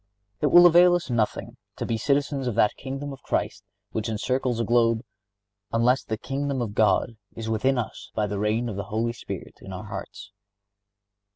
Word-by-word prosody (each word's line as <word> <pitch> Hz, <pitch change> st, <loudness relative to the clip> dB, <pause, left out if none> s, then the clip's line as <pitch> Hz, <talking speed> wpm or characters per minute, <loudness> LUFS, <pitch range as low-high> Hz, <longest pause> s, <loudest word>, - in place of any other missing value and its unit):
It -, -, +2 dB
will 175 Hz, 0 st, +8 dB
avail 175 Hz, +1 st, +7 dB
us 175 Hz, -7 st, -3 dB
nothing 115 Hz, -3 st, -1 dB, 0.2 s
to -, -, -4 dB
be 115 Hz, -, -1 dB
citizens 140 Hz, +2 st, 0 dB
of 120 Hz, -, -1 dB
that 105 Hz, -2 st, +3 dB
Kingdom 135 Hz, +1 st, -5 dB
of 135 Hz, -, -12 dB
Christ -, -, -2 dB, 0.3 s
which 110 Hz, +1 st, -2 dB
encircles 125 Hz, +3 st, -1 dB
the 115 Hz, -, 0 dB
globe, 115 Hz, -1 st, +2 dB, 0.7 s
unless 125 Hz, +3 st, +2 dB
the 110 Hz, -, -3 dB
Kingdom 140 Hz, +2 st, -2 dB
of 115 Hz, -4 st, -3 dB
God 110 Hz, +2 st, +2 dB, 0.2 s
is 110 Hz, -1 st, -5 dB
within 130 Hz, +5 st, +1 dB
us 120 Hz, -, -5 dB
by 105 Hz, -, +1 dB
the 105 Hz, -1 st, -3 dB
reign 110 Hz, +3 st, 0 dB
of 105 Hz, -4 st, -5 dB
the 100 Hz, -, -3 dB
Holy 110 Hz, +3 st, -1 dB
Spirit -, -, -8 dB
in 95 Hz, -, -9 dB
our 95 Hz, +2 st, -6 dB
hearts. 100 Hz, 0 st, -8 dB
115 Hz, 185 wpm, -25 LUFS, 110-135 Hz, 0.7 s, will